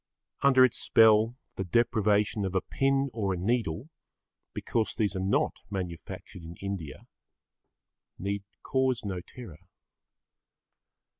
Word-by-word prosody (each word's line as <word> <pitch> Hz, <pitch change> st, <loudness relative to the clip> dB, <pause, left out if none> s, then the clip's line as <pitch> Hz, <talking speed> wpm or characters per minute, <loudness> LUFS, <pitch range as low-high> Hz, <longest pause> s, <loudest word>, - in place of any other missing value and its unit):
Under 130 Hz, -2 st, +6 dB
its 125 Hz, -, -1 dB
spell 110 Hz, +1 st, +5 dB, 0.2 s
the 95 Hz, -, -1 dB
deprivation 105 Hz, 0 st, +2 dB
of 95 Hz, -1 st, -3 dB
a 95 Hz, -, +3 dB
pin 135 Hz, 0 st, 0 dB
or 100 Hz, -4 st, -1 dB
a -, -, -5 dB
needle, 110 Hz, -, -1 dB, 0.6 s
because 115 Hz, -2 st, -2 dB
these 105 Hz, -2 st, 0 dB
are -, -, -1 dB
not 95 Hz, +2 st, +1 dB, 0.2 s
manufactured 90 Hz, 0 st, -6 dB
in 85 Hz, +1 st, -9 dB
India, 95 Hz, -7 st, -6 dB, 1.1 s
need 100 Hz, +1 st, -3 dB, 0.2 s
cause 130 Hz, -4 st, 0 dB
no 95 Hz, -3 st, -3 dB
terror. 100 Hz, -7 st, -11 dB
105 Hz, 120 wpm, -29 LUFS, 95-120 Hz, 1.1 s, Under